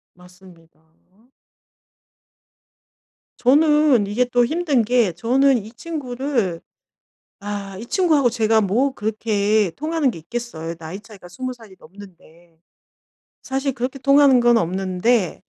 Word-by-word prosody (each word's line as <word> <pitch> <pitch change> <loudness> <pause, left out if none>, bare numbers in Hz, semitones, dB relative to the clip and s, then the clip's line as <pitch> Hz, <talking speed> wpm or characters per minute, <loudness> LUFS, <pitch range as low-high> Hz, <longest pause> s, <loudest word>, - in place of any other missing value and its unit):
맞습니다. 180 -3 -19 2.6
저는 295 -4 +3
이게 225 +5 0
또 245 0 +2
힘든 300 -4 0
게 235 -5 +1
저는 260 +9 +2
이 220 0 -8
친구를 250 - -3 0.8
아 200 -1 -6
이 225 - -8
친구하고 310 -6 +2
제가 225 -1 +2
뭐 230 +7 0
그렇게 215 -3 0
통하는 310 -2 0
게 165 - -10
있겠어요 170 -4 -6
나이 165 +4 -8
차이가 205 -4 -15
20 255 +8 -5
살이 225 -5 -16
넘는데. 170 -3 -17 0.8
사실 270 +1 -2
그렇게 255 +3 -4
통하는 275 0 +4
건 240 -1 +4
없는데 185 +3 -1
230 Hz, 230 characters per minute, -21 LUFS, 190-260 Hz, 2.6 s, 통하는